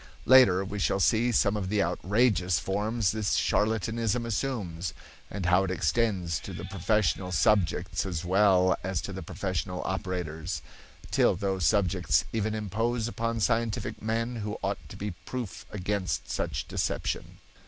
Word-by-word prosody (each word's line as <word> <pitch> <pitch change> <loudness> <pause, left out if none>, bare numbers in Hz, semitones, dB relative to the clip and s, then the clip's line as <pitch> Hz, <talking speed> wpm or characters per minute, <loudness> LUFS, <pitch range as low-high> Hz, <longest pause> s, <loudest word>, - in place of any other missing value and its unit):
Later 100 -8 +6
we 105 +1 -5
shall 95 +2 +1
see 115 +5 +3
some 105 -2 +3
of 95 -3 -2
the 105 -1 +2
outrageous 90 +1 +2
forms 105 +2 0
this 110 -2 0
charlatanism 110 +2 +1
assumes, 100 - -3 0.3
and 100 -3 -4
how 90 +2 +4
it 95 - -2
extends 95 -3 0
to - - -8
the - - -6
professional 100 -3 0
subjects 95 -1 +2
as 90 -3 -4
well 95 -1 +4
as 95 -1 -1
to - - -6
the - - -5
professional 90 -1 -3
operators, 90 -3 -3 0.5
till - - +4
those 95 -3 0
subjects 95 -4 +2
even 110 -1 0
impose 110 +3 -1
upon 115 0 -2
scientific 115 0 0
men 115 +2 -1
who 105 -1 -4
ought - - -1
to - - -9
be 105 +1 -3 0.2
proof 125 -6 -5
against 100 -1 -2
such - - -3
deception. - - -2
100 Hz, 145 wpm, -28 LUFS, 90-110 Hz, 0.5 s, Later